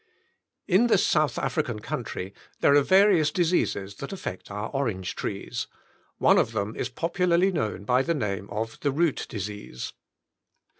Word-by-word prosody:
In 200 +6 +4
this 210 -5 +4
South 150 -5 +2
African 125 -3 -1
country 100 -2 -5 0.3
there 140 - +5
are 145 - +6
various 190 -2 +5
diseases 150 - 0
that 140 - -6
affect 180 - -6
our 105 +2 -4
orange 115 -10 -2
trees. - - -4 0.5
One - - +5
of 115 - 0
them 105 0 -2
is 125 - -2
popularly 175 +6 +1
known 110 - -2
by 125 +5 +3
the 165 +4 0
name 100 -7 -3
of 110 +2 -4
the 145 - 0
root 155 +2 0
disease. 105 - -6
135 Hz, 150 wpm, -26 LUFS, 105-170 Hz, 0.5 s, are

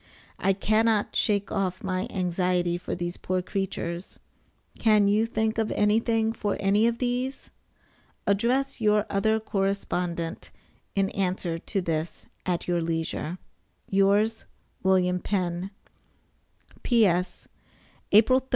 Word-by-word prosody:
I 195 - +3
cannot 215 +2 +1
shake 205 -1 +1
off 185 -2 -2
my 185 +2 -1
anxiety 180 -2 0
for - - -4
these 175 0 -4
poor 185 0 -2
creatures. 180 -2 -4 0.6
Can 215 -3 +4
you 215 +3 +3
think 220 0 -1
of 220 - 0
anything 225 +2 +2
for 205 -2 -2
any 205 +3 +3
of 235 0 0
these? 250 +2 -2 0.7
Address 245 +7 +1
your 210 -1 +3
other 220 +3 +2
correspondent 180 -5 -2 0.5
in 195 -1 +1
answer 180 -3 -1
to 195 - -2
this 165 -1 -3 0.2
at 175 -2 -1
your 175 -1 +1
leisure. 165 +1 -2 0.5
Yours, 200 +3 +2 0.4
WM. 180 -1 +2
PENN. 180 -1 -2 1.1
P.S. 185 -7 +2 0.6
April 230 +5 +6
3d. 260 - -27
195 Hz, 115 wpm, -26 LUFS, 180-220 Hz, 1.1 s, April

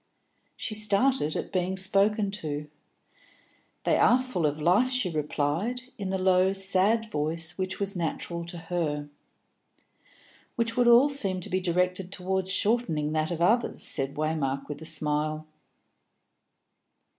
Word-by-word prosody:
She 220 - -3
started 215 - +1
at - - -4
being 185 0 -1
spoken 200 +2 +3
to. 150 -6 -4 1.2
"They - - +2
are 245 - +4
full 210 -11 -1
of 150 +1 -3
life," 185 +11 +3
she 250 -8 +1
replied, 155 - -2 0.2
in 195 -2 -4
the 190 - -1
low 185 0 +2
sad 195 +3 +2
voice 160 +2 -2
which 185 0 -4
was 200 0 0
natural 170 0 -3
to 170 +1 -3
her. 165 -4 -3 1.5
"Which 230 -1 -1
would 245 -1 +2
all 240 +4 +6
seem 200 -10 +1
to - - -9
be 185 - +1
directed 180 +1 -1
towards 190 0 -2
shortening 190 -9 +1
that 155 0 -1
of 170 -1 -4
others," 235 +7 +2
said 135 0 +2
Waymark, 145 -3 -2
with 145 0 -7
a 160 - -5
smile. 155 0 -1
185 Hz, 140 wpm, -27 LUFS, 155-205 Hz, 1.5 s, all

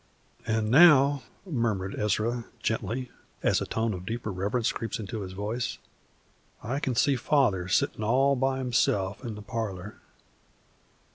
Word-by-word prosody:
"An' 110 -1 0
now," 145 -2 +7 0.2
murmured 115 - -1
Ezra, 110 +3 -1
gently, 120 +3 -2 0.3
as - - +2
a - - -3
tone 110 -1 -1
of 90 -1 -6
deeper 115 +2 -4
reverence 100 +6 0
crept 115 0 -4
into 105 +1 -5
his 95 -1 -6
voice, 105 +5 -3 0.9
"I 130 +5 -2
can 130 -4 -2
see 140 +3 +3
Father 120 -9 +2
sittin' 100 +3 +1
all 135 +5 +3
by 135 +1 0
himself 115 -5 0
in 115 -4 -5
the 105 - -9
parlor. 105 -2 -5
115 Hz, 140 wpm, -28 LUFS, 105-130 Hz, 0.9 s, now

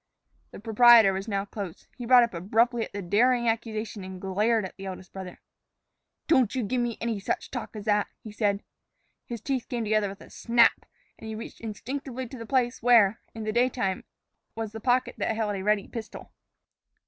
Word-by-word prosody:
The - - -11
proprietor 225 -1 +6
was 195 +3 -4
now 200 -2 -1
close. 200 -4 -7
He 245 -2 -7
brought 250 -1 +8
up 235 - -2
abruptly 225 +7 +1
at - - -15
the 200 -1 -5
daring 235 +6 +3
accusation 225 -2 -2
and 185 0 -8
glared 210 +3 +1
at 185 - -9
the 195 0 -8
eldest 185 -1 -8
brother. 190 -2 -8 0.9
"Don't 260 -7 +3
you 255 - 0
give 245 +4 -1
me 240 -2 -2
any 230 -3 -2
such 195 - -3
talk 245 -3 -6
as 210 -1 -7
that," 210 -1 +2 0.2
he 215 - -8
said. 205 -1 0 0.6
His 235 -3 -6
teeth 260 0 -2
came 240 -2 -2
together 215 -1 +1
with 195 0 -10
a - - -14
snap, 235 -1 +3 0.3
and 225 - -9
he 220 - -5
reached 225 - -9
instinctively 255 +3 -5
to 260 - -8
the 230 - -8
place 250 -2 0
where, 225 -4 +5
in 225 - -5
the 215 - -1
daytime, 235 -5 0 0.5
was 225 -2 -4
the 220 - -7
pocket 250 +1 +1
that 225 - 0
held 215 -2 -1
a 190 - -4
ready 210 0 +1
pistol. 225 -2 -8
225 Hz, 195 wpm, -27 LUFS, 200-240 Hz, 0.9 s, brought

